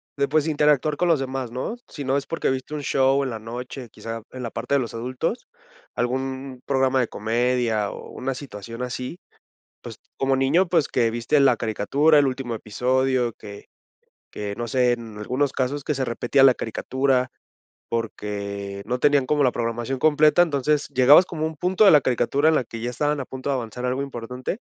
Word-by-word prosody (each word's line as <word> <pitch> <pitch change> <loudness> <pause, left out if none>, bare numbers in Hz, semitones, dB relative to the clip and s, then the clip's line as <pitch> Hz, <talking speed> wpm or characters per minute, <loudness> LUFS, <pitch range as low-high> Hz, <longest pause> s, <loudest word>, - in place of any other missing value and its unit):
de, 140 0 +1
pues, 155 +1 +2
interactuar 150 -1 +2
con 180 +4 0
los 165 -4 +3
demás, 130 -2 -3
¿no? 130 - -4
Si 145 - -7
no 135 +1 +1
es 140 - -4
porque 165 - -1
viste 130 +3 -4
un 145 - -5
show 135 +1 +2
en 130 - -3
la 110 - -5
noche, 120 +2 -7
quizá 115 +1 -7
en 130 -1 -7
la 115 - -4
parte 140 - -2
de 140 - +4
los 120 -3 -4
adultos, 130 - -3 0.5
algún 130 +1 -3
programa 130 -1 +2
de 125 - +1
comedia 115 -1 0
o - - -9
una 130 0 -4
situación 115 -2 -8
así, 125 +6 -5 0.6
pues, - - -9 0.2
como 135 0 +2
niño, 160 +8 +2
pues, 165 -4 +2
que 115 -3 +1
viste 120 +6 +1
la 135 -4 +5
caricatura, 140 +9 +2
el 145 - +4
último 130 -3 -3
episodio, 125 +3 0
que 105 -2 -11 0.6
que 105 -1 -5
no 120 0 -4
sé, 125 0 +3
en 115 -3 -7
algunos 130 +6 -1
casos 135 +2 -2
que 150 - -1
se 130 -1 -1
repetía 120 +3 +2
la 135 - +8
caricatura 130 +3 -1 0.6
porque 100 -3 -4
no 125 +2 -2
tenían 145 -1 +3
como 150 +1 +2
la 125 - +3
programación 120 +2 -2
completa, 155 +3 +4
entonces 150 -2 +1
llegabas 135 +7 +6
como 160 -4 -3
un 160 0 -4
punto 185 +6 +2
de - - +8
la 150 - +7
caricatura 135 +5 +2
en 160 - +3
la 130 - +1
que 115 0 -8
ya 120 - -2
estaban 145 +4 -1
a - - -6
punto 130 +2 -6
de 135 - +1
avanzar 125 +1 -5
algo 130 +2 -1
importante 125 - -5
130 Hz, 195 wpm, -23 LUFS, 120-140 Hz, 0.6 s, la